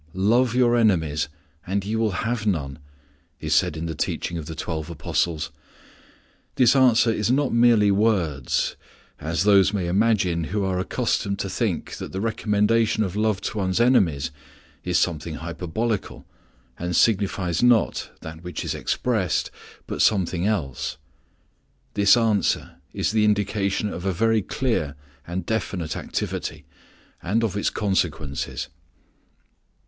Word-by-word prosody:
"Love 115 Hz, +5 st, +2 dB
your 120 Hz, -1 st, +4 dB
enemies, 80 Hz, -11 st, +2 dB, 0.4 s
and 100 Hz, +1 st, -1 dB
ye 110 Hz, +2 st, -2 dB
will 110 Hz, -1 st, +1 dB, 0.2 s
have 115 Hz, -2 st, -1 dB
none," 75 Hz, -7 st, -1 dB, 0.6 s
is -, -, -1 dB
said 75 Hz, -, +2 dB
in 80 Hz, -, -4 dB
the 80 Hz, -, -3 dB
teaching 85 Hz, -, -2 dB
of 80 Hz, -3 st, -5 dB
the 80 Hz, -, -6 dB
Twelve 80 Hz, -1 st, -4 dB
Apostles. 80 Hz, -1 st, -1 dB, 1.0 s
This 125 Hz, 0 st, +5 dB
answer 125 Hz, -3 st, +5 dB
is 105 Hz, 0 st, 0 dB
not 135 Hz, +1 st, +2 dB
merely 115 Hz, -3 st, +5 dB
words, 95 Hz, -, +1 dB, 0.4 s
as 80 Hz, +2 st, -1 dB
those 100 Hz, -1 st, +5 dB
may 95 Hz, -4 st, -1 dB
imagine 90 Hz, -3 st, +1 dB
who 100 Hz, +3 st, -1 dB
are 95 Hz, -1 st, -1 dB
accustomed 100 Hz, +2 st, -1 dB
to 100 Hz, -, -3 dB
think 100 Hz, -4 st, -2 dB
that -, -, -7 dB
the 95 Hz, -, -3 dB
recommendation 110 Hz, +1 st, +1 dB
of 95 Hz, -2 st, -4 dB
love 105 Hz, -2 st, +1 dB
to 110 Hz, -, -3 dB
one's 95 Hz, +1 st, 0 dB
enemies 85 Hz, -, +3 dB, 0.5 s
is 90 Hz, -1 st, +1 dB
something 80 Hz, -2 st, -1 dB
hyperbolical, 90 Hz, +7 st, -3 dB, 0.5 s
and 90 Hz, 0 st, -2 dB
signifies 95 Hz, -5 st, +2 dB
not 120 Hz, -3 st, +3 dB
that 80 Hz, +1 st, -9 dB
which 90 Hz, 0 st, -5 dB
expressed, 105 Hz, -10 st, -1 dB, 0.3 s
but -, -, -3 dB
something 95 Hz, -3 st, +2 dB
else. 75 Hz, -8 st, -2 dB, 1.0 s
This 100 Hz, +2 st, +5 dB
answer 110 Hz, -3 st, +1 dB
is -, -, -1 dB
the 110 Hz, -1 st, +2 dB
indication 105 Hz, -1 st, 0 dB
of 85 Hz, -, -6 dB
a -, -, +2 dB
very 115 Hz, +4 st, +2 dB
clear 95 Hz, -, -1 dB, 0.3 s
and 85 Hz, +1 st, -4 dB
definite 95 Hz, -7 st, -2 dB
activity, -, -, -4 dB, 0.6 s
and 105 Hz, +6 st, 0 dB
of 110 Hz, -3 st, -1 dB
its 105 Hz, -, +1 dB
consequences. 80 Hz, -8 st, -2 dB
100 Hz, 135 wpm, -24 LUFS, 85-110 Hz, 1.0 s, This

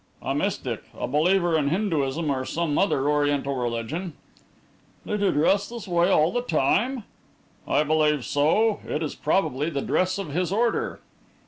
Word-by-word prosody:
"A -, -, -1 dB
mystic -, -, -2 dB, 0.2 s
a -, -, -3 dB
believer 170 Hz, +5 st, +2 dB
in 150 Hz, -3 st, +1 dB
Hinduism 160 Hz, -5 st, 0 dB
or 130 Hz, -1 st, -1 dB
some 160 Hz, +2 st, -2 dB
other 145 Hz, -8 st, +1 dB
Oriental 145 Hz, -2 st, +1 dB
religion." 125 Hz, +8 st, -3 dB, 0.9 s
"Did 210 Hz, -, -2 dB
he 200 Hz, -, +3 dB
dress 190 Hz, +7 st, +2 dB
this 230 Hz, -3 st, -8 dB
way 175 Hz, 0 st, +2 dB
all 160 Hz, -2 st, +3 dB
the 245 Hz, -, -1 dB
time?" 230 Hz, -, +1 dB, 0.6 s
"I -, -, +2 dB
believe 150 Hz, -3 st, +1 dB
so. 200 Hz, +10 st, +2 dB
It 155 Hz, -, -2 dB
is 150 Hz, -, -3 dB
probably 150 Hz, -3 st, 0 dB
the 140 Hz, -4 st, -3 dB
dress 185 Hz, +1 st, 0 dB
of 195 Hz, -5 st, -5 dB
his 180 Hz, +3 st, -1 dB
order." 230 Hz, +3 st, 0 dB
160 Hz, 155 wpm, -25 LUFS, 145-195 Hz, 0.9 s, he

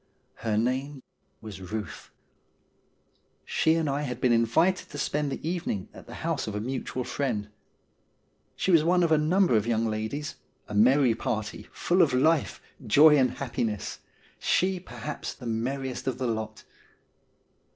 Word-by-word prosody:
Her 110 Hz, -2 st, -1 dB
name 130 Hz, +4 st, -1 dB, 0.4 s
was 110 Hz, -3 st, -8 dB
Euth. 100 Hz, +3 st, -6 dB, 1.4 s
She 160 Hz, 0 st, +2 dB
and 165 Hz, -2 st, 0 dB
I 140 Hz, +1 st, 0 dB
had 125 Hz, -4 st, -4 dB
been 125 Hz, -, +2 dB
invited 120 Hz, +11 st, +2 dB
to 145 Hz, -, -8 dB
spend 145 Hz, 0 st, -1 dB
the 150 Hz, -, -5 dB
evening 165 Hz, -, -3 dB
at -, -, -13 dB
the -, -, -9 dB
house -, -, -1 dB
of 105 Hz, -, -4 dB
a -, -, -1 dB
mutual 130 Hz, +2 st, -3 dB
friend. 115 Hz, -7 st, -2 dB, 1.1 s
She 190 Hz, -, 0 dB
was 165 Hz, -3 st, +6 dB
one 175 Hz, +2 st, +3 dB
of 165 Hz, -, +1 dB
a 155 Hz, -, +5 dB
number 175 Hz, -2 st, +3 dB
of 110 Hz, 0 st, +1 dB
young 115 Hz, -1 st, +1 dB
ladies 110 Hz, +7 st, -3 dB, 0.2 s
— -, -, -42 dB
a -, -, -7 dB
merry 125 Hz, +4 st, +5 dB
party, 110 Hz, -1 st, -4 dB
full 180 Hz, +2 st, +1 dB
of 140 Hz, -7 st, +3 dB
life, 155 Hz, +4 st, +2 dB, 0.3 s
joy, 150 Hz, +7 st, +7 dB
and 130 Hz, -3 st, +4 dB
happiness; 120 Hz, -5 st, -3 dB, 0.4 s
she, 185 Hz, 0 st, +1 dB
perhaps, 150 Hz, -4 st, -6 dB
the 125 Hz, -, -11 dB
merriest 130 Hz, +4 st, -3 dB
of 130 Hz, -, -1 dB
the 130 Hz, -, -2 dB
lot. 110 Hz, -2 st, -3 dB
130 Hz, 160 wpm, -27 LUFS, 110-150 Hz, 1.4 s, joy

